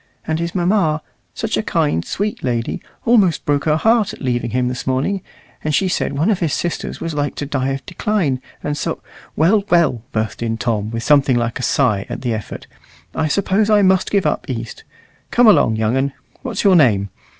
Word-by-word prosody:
And 160 0 -1
his 170 +2 -3
mamma 175 -4 +1 0.3
such - - -2
a - - +1
kind, 80 +3 0
sweet 210 +1 -3
lady 120 -2 -2 0.2
almost 200 - +3
broke 145 -1 +1
her 155 -1 +3
heart 225 +3 +2
at - - -11
leaving 120 -3 -1
him 125 +1 0
this 125 +2 -4
morning; 135 +10 0 0.4
and 150 -1 0
she 190 - +2
said 180 - -1
one 165 +9 +2
of 195 - 0
his 165 -5 0
sisters 175 - -3
was 165 -1 -4
like 145 -2 -2
to 145 - -4
die 135 -2 -1
of 135 0 -4
decline, 175 - -1 0.2
and 150 - -2
so - - -3 0.2
" - - -22
"Well, 195 +7 +3
well," 165 -9 +3
burst 110 -2 -2
in 115 -1 -1
Tom, 110 -2 -1
with 115 0 -4
something 140 -2 +4
like 120 0 -1
a - - -3
sigh 115 -7 +1
at - - -5
the 120 -2 0
effort, 110 -2 -6 0.5
"I 160 - 0
suppose 200 +5 +1
I 210 -1 +5
must 190 -1 +3
give 200 -2 +1
up - - -1
East. 115 -3 -5 0.5
Come 245 - +4
along, 200 - +5
young 110 +2 0
un. 135 +1 0 0.3
What's 255 -4 -3
your 195 -3 +5
name? 105 - +4
145 Hz, 205 wpm, -19 LUFS, 120-185 Hz, 0.5 s, I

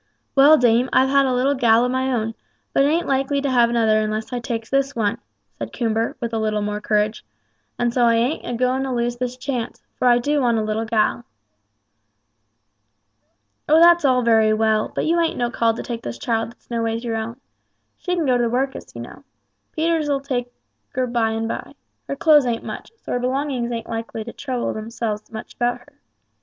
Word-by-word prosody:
"Well, 290 +3 +7
dame, 245 0 +3
I've 265 +1 +4
had 275 -1 +4
a - - +1
little 255 +3 +2
gal 235 -3 +4
o' - - +1
my 260 +1 -1
own, 225 -2 -1 0.4
but 275 - +4
ain't 325 +4 +1
likely 275 +1 0
to 280 -1 -1
have 240 -2 +4
another 220 -2 +2
unless 215 +3 -3
I 245 - -1
takes 230 -1 -4
this 275 0 0
one," 210 -3 0 0.4
said 115 -1 -5
Coomber, 225 -1 -1
with 235 -1 -4
a 225 - 0
little 215 -1 -1
more 210 0 -3
courage, 210 0 0 0.5
"and 240 -1 0
so 245 -1 +3
I 230 0 +4
ain't 240 +7 0
a 245 - -4
going 255 +2 +1
to 270 -1 -2
lose 240 0 -1
this 250 0 -3
chance; 255 -3 -4
for 255 - 0
I 240 -1 +6
do 290 +4 0
want 240 -3 +2
a 220 - 0
little 215 +1 -2
gal." 220 +2 0 2.4
"Oh, 310 +2 +6
that's 345 0 +6
all 255 -3 +3
very 220 -2 +4
well; 215 0 +1
but - - -2
you 335 +2 +2
ain't 335 -1 0
no 240 -1 -1
call 230 -2 +1
to - - -5
take 235 -1 -5
this 120 0 -6
child 225 - -1
that's 240 - -20
no 230 -1 -1
ways 230 +1 -2
your 230 -2 -2
own. 230 +3 -5 0.6
She 360 -1 -2
can 335 -3 0
go 255 -2 +3
to 240 - +1
the - - 0
workus, 265 +3 -3
you - - -6
know. - - -11 0.5
Peters'll 315 -3 0
take 245 -3 -3 0.4
her 255 0 +1
by 235 -2 0
and 225 0 -2
by. - - -5 0.3
Her 275 - -3
clothes 300 -3 +5
ain't 230 -1 -2
much, - - -7
so - - -9
her 245 - 0
belongings 255 -1 -1
ain't 230 -1 -4
likely 225 -1 -5
to 235 - -9
trouble 255 -4 -3
themselves 215 -1 -5
much 220 -1 -8
about 245 0 0
her. 245 - -23
240 Hz, 210 wpm, -21 LUFS, 225-265 Hz, 2.4 s, Well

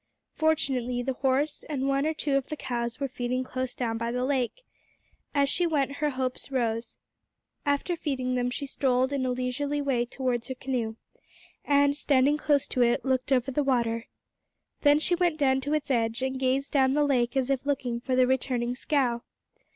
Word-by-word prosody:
Fortunately 265 -6 0
the 265 +1 -1
horse 270 +3 0
and 275 -3 -1
one 275 +2 +1
or 315 - +1
two 290 -2 0
of 275 -2 0
the 305 - -4
cows 235 -2 -3
were 280 - -1
feeding 250 0 -2
close 255 -1 -4
down 225 -2 -2
by 230 0 -1
the 250 +1 -1
lake. 270 - -1 0.7
As 280 -1 +4
she 345 +5 +1
went 280 -3 0
her 300 0 +1
hopes 255 -1 -3
rose. 230 -3 -1 0.7
After 285 +5 +1
feeding 260 -6 -2
them 245 0 0
she 280 +3 -4
strolled 260 -1 +1
in 260 -2 0
a - - 0
leisurely 255 +4 -1
way 260 -4 0
towards 245 -2 -2
her 260 - -4
canoe, 245 -4 -2 0.7
and, 285 0 +3
standing 285 0 +3
close 290 -2 +2
to 250 - 0
it, 240 +2 +2
looked 260 0 0
over 260 0 +2
the 295 - +1
water, 235 -3 0 0.7
then 290 -1 +6
she 315 +3 +1
went 350 -2 +2
down 265 -3 +2
to 290 +3 -2
its 285 -2 -2
edge, 230 0 0
and 265 0 -2
gazed 265 +1 0
down 265 -2 +4
the 295 0 +3
lake 250 -2 +1
as 265 0 +1
if 270 -2 0
looking 260 -4 -1
for 255 +1 -1
the 255 0 +5
returning 250 -2 0
scow. 250 -3 0
265 Hz, 190 wpm, -27 LUFS, 250-285 Hz, 0.7 s, then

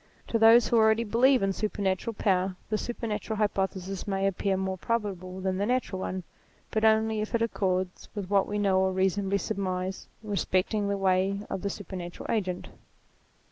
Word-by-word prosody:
To 230 - +1
those 225 +1 +7
who 235 - +2
already 220 +1 +4
believe 245 +3 +4
in 195 0 +1
supernatural 205 +1 -1
power, 190 -2 +1 0.2
the 215 - +2
supernatural 220 -2 -3
hypothesis 195 -2 -1
may 195 -1 0
appear 195 0 0
more 190 -1 -2
probable 190 -4 -3
than 190 0 -1
the 200 - +1
natural 245 -6 0
one; 185 0 -3 0.5
but 220 - 0
only 220 0 +3
if 215 - -2
it 230 - +1
accords 185 -4 -1
with 200 -3 -4
what 200 0 +2
we 205 - -2
know 195 -2 +3
or 190 0 +2
reasonably 190 +1 +1
surmise 185 -1 -3 0.2
respecting 205 0 0
the 200 - 0
ways 195 +1 +1
of 190 - -2
the 200 - -1
supernatural 180 -3 -6
agent. 185 -5 -2
195 Hz, 170 wpm, -28 LUFS, 190-215 Hz, 0.5 s, those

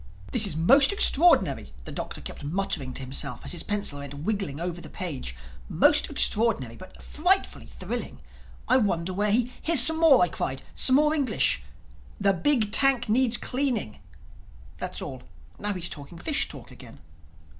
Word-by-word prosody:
"This 225 -5 +4
is 155 - -3
most 270 - +4
extraordinary," 355 -4 +4
the - - -10
Doctor - - -7
kept - - -9
muttering 145 -4 -3
to 135 - -6
himself 130 -1 -6
as - - -3
his 175 - -2
pencil 205 -9 -3
went 140 0 -9
wiggling 170 -1 -4
over 175 0 -5
the - - -12
page—"Most 65 - -2
extraordinary—but 185 - 0
frightfully 365 +5 -1
thrilling. - - -6 0.5
I 255 - +3
wonder 185 -6 -2
where 205 +3 -1
he—" 240 +4 0
"Here's 330 -3 +6
some 320 0 +7
more," 295 - +5
I - - +1
cried—"some 160 - -1
more 300 +2 +2
English.... 285 -4 0 0.6
'The 200 -1 +2
big 220 - 0
tank 260 -1 +2
needs 240 +1 +4
cleaning'.... 250 - -3 0.8
That's - - -5
all. - - -9 0.4
Now 205 0 -3
he's 180 -2 -5
talking 145 +2 -10
fish 175 - -2
talk - - -13
again." - - -14
205 Hz, 155 wpm, -25 LUFS, -, 0.8 s, some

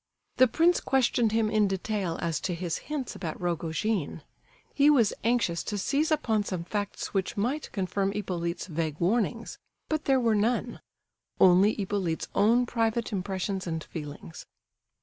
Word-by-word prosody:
The 255 +1 +7
prince 335 +8 +3
questioned 245 -4 +2
him 220 -1 +1
in 215 -2 +3
detail 190 -2 -2
as 165 -2 -1
to 180 - -2
his 170 -1 -3
hints 290 -4 -3
about 165 -4 -5
Rogojin. 170 0 -2 0.5
He 285 +1 +5
was 240 -8 +4
anxious 225 -8 +1
to 210 - -3
seize 285 - +1
upon 230 -9 +1
some 185 -4 -4
facts 205 +3 -4
which 195 +2 -1
might 255 +9 -1
confirm 195 0 -1
Hippolyte's 175 -4 -3
vague 160 -3 -3
warnings; 230 +5 0 0.3
but 310 -1 -1
there 270 -1 +4
were 230 -3 +2
none; 220 +4 0 0.6
only 190 +3 +6
Hippolyte's 190 -5 -2
own 230 +5 +4
private 230 -1 -1
impressions 190 0 -3
and 160 -1 -3
feelings. 150 0 -8
205 Hz, 150 wpm, -28 LUFS, 175-235 Hz, 0.6 s, The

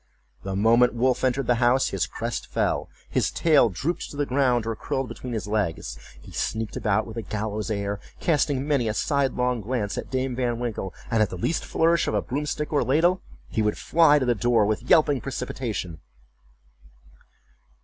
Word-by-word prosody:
The 95 0 -4
moment 115 +4 +4
Wolf 125 +2 +1
entered 130 +1 +1
the 120 0 +1
house 130 +2 +3
his 95 -3 -1
crest - - -4
fell, - - -1 0.2
his - - +1
tail 150 -8 +4
drooped 140 - -3
to 145 - -9
the 145 - +1
ground, 125 -4 +2
or 115 0 -2
curled 135 +4 -3
between 125 0 -7
his 110 - -3
legs, 105 - -2 0.2
he - - -14
sneaked 110 -1 -3
about 105 0 +1
with 110 0 -9
a - - -1
gallows 105 +1 -3
air, 100 -1 -2 0.2
casting 145 -4 +1
many 140 -6 +1
a 110 - -1
sidelong 125 -2 0
glance 105 -2 -2
at - - -7
Dame 130 -1 -1
Van 120 -2 -1
Winkle, 115 -5 -3 0.2
and 115 -1 +3
at 105 - +3
the 90 - -6
least 155 - -1
flourish 165 +1 +2
of - - 0
a 105 - +2
broom 145 +5 -3
stick 150 +1 -3
or 145 - +3
ladle, 165 +9 +2 0.3
he 110 - -1
would 105 -1 0
fly 160 -2 +4
to 135 - 0
the 120 - +3
door 120 -1 +2
with 110 +4 -2
yelping 145 -5 +4
precipitation. 115 - -4
120 Hz, 190 wpm, -25 LUFS, 110-135 Hz, 0.3 s, moment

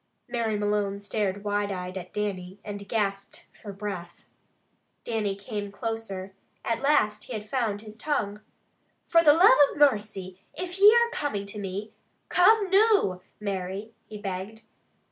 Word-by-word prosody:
Mary 225 -3 -1
Malone 205 -1 0
stared 200 -1 -2
wide 205 0 -1
eyed 180 -1 -5
at 180 -1 -7
Dannie, 195 -2 -4
and 205 -1 -7
gasped 200 -3 -2
for 205 - -9
breath. 195 -4 -7 0.8
Dannie 215 -4 -1
came 205 0 -5
closer. 200 -4 -5 0.3
At 230 0 -1
last 270 -7 +2
he 255 - -7
had 215 -1 -5
found 215 -4 -1
his 215 -1 -10
tongue. 215 -6 -2 0.6
"Fra 335 - +5
the 300 - +8
love 370 +8 +7 0.2
of - - -9
mercy, 205 -9 +1 0.2
if 360 +2 -5
ye 410 +2 +9
are 470 +1 +4
comin' 210 - -2
to 200 +1 -6
me, 200 +2 -5 0.4
come 395 +1 +4
noo, 395 - +4 0.2
Mary" 200 +1 -4
he 215 - -8
begged. 205 +2 -6
210 Hz, 145 wpm, -27 LUFS, 195-235 Hz, 0.8 s, ye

